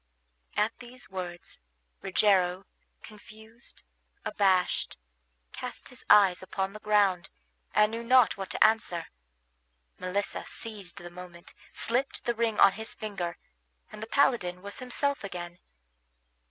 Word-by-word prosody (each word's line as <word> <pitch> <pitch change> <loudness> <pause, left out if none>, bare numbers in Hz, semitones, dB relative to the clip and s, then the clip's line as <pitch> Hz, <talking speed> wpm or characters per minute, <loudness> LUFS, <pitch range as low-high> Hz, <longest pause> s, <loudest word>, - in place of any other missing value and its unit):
At 215 +2 +2
these 250 -3 -12
words, 175 - -6 0.4
Rogero, 190 -1 +2 0.4
confused, 220 +2 -13 0.4
abashed, 190 -3 +1 0.6
cast - - -6
his - - -10
eyes 195 -4 +6
upon 190 +1 -3
the 215 - -8
ground, 205 -4 +2 0.5
and 210 0 +5
knew 230 +1 -4
not 250 0 +5
what 195 -1 -6
to - - +3
answer. 215 -6 +2 0.9
Melissa 195 +2 -2
seized 205 -5 -6
the 175 0 -9
moment, 175 -1 -11 0.2
slipped 250 +4 0
the 240 - +1
ring 225 -2 0
on 200 - +8
his 220 +3 -3
finger, 190 -5 -4 0.5
and - - -10
the 220 - -5
paladin 195 -9 +2
was 200 0 -7
himself 275 +2 0
again. 175 -2 -7
200 Hz, 125 wpm, -29 LUFS, 180-225 Hz, 0.9 s, on